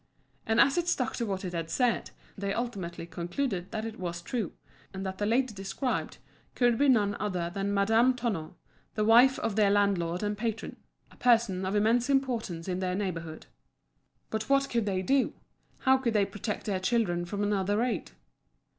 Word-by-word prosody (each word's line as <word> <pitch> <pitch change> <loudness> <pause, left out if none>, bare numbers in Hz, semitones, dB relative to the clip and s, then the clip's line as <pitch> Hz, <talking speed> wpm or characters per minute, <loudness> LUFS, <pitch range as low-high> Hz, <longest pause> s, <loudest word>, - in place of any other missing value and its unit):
And 225 +1 +2
as 275 +7 +5
it 345 - -2
stuck 255 -8 0
to 235 - -2
what 195 -1 -3
it 180 - -4
had 165 -1 -3
said, 245 +2 +1 0.3
they 200 -1 -2
ultimately 190 -9 -4
concluded 175 +3 -3
that 220 -1 -4
it 225 0 -7
was 170 -1 -4
true, 220 -2 -3 0.4
and 190 +1 -4
that 190 0 -5
the 205 - 0
lady 245 +1 +1
described 195 +6 -3 0.4
could 240 -2 +3
be 285 0 +4
none 205 -5 +3
other 180 -5 -2
than 200 0 -1
Madame 225 +5 +3
Tonno, 200 -10 -3 0.4
the 215 -1 +1
wife 245 +4 +6
of 215 - -2
their 210 -2 +4
landlord 195 -3 +1
and 210 0 -1
patron 225 +1 -4 0.3
a - - -18
person 225 -6 +3
of 195 - -1
immense 230 +5 +2
importance 235 -11 0
in 185 -1 -2
the 185 -1 -1
neighbourhood. 165 -5 -4 0.9
But 220 +2 -3
what 275 0 +3
could 230 -3 0
they 190 -2 0
do? 270 +4 +2 0.5
How 265 0 +5
could 240 -3 0
they 205 -1 +4
protect 205 +2 -5
their 195 -3 -1
children 185 -4 +1
from 200 +4 -3
another 205 0 +1
raid? 240 +2 -1
210 Hz, 180 wpm, -29 LUFS, 190-235 Hz, 0.9 s, wife